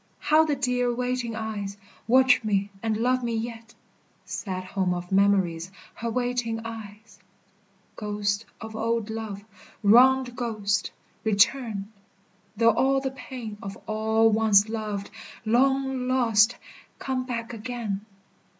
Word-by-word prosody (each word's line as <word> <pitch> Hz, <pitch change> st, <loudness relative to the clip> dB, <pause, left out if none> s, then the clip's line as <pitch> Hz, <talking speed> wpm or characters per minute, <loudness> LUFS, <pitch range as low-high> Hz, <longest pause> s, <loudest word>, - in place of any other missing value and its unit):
How 310 Hz, +1 st, +4 dB
the 300 Hz, -2 st, 0 dB
dear 250 Hz, -2 st, 0 dB
waiting 250 Hz, -1 st, -2 dB
eyes 210 Hz, -3 st, -4 dB, 0.3 s
Watch 255 Hz, +1 st, +5 dB
me 200 Hz, -2 st, 0 dB
and 220 Hz, -1 st, 0 dB
love 250 Hz, +2 st, +1 dB
me 235 Hz, -1 st, -1 dB
yet 230 Hz, 0 st, -6 dB, 0.5 s
Sad 185 Hz, -3 st, -4 dB
home 185 Hz, -1 st, -1 dB
of 175 Hz, +1 st, -6 dB
memories, 190 Hz, -3 st, +2 dB, 0.2 s
Her 235 Hz, -, -4 dB
waiting 245 Hz, -1 st, -1 dB
eyes! 215 Hz, -2 st, -9 dB, 0.8 s
Ghost 210 Hz, 0 st, -2 dB
of 220 Hz, -1 st, -8 dB
old 225 Hz, 0 st, -1 dB
love, 215 Hz, -2 st, -6 dB, 0.4 s
wronged 250 Hz, +3 st, +5 dB
ghost, 220 Hz, -4 st, -1 dB, 0.3 s
Return: 220 Hz, -1 st, +1 dB, 0.7 s
though 230 Hz, +1 st, +5 dB
all 270 Hz, +4 st, +2 dB
the 265 Hz, -1 st, -3 dB
pain 245 Hz, -6 st, -8 dB
Of 195 Hz, -2 st, -7 dB
all 220 Hz, +1 st, +2 dB
once 215 Hz, -1 st, +4 dB
loved, 210 Hz, -3 st, -4 dB, 0.3 s
long 265 Hz, +2 st, +2 dB
lost, 240 Hz, -3 st, +3 dB, 0.4 s
Come 260 Hz, -1 st, -2 dB
back 235 Hz, -1 st, -4 dB
again. 225 Hz, -3 st, -4 dB
225 Hz, 125 wpm, -26 LUFS, 205-245 Hz, 0.8 s, Watch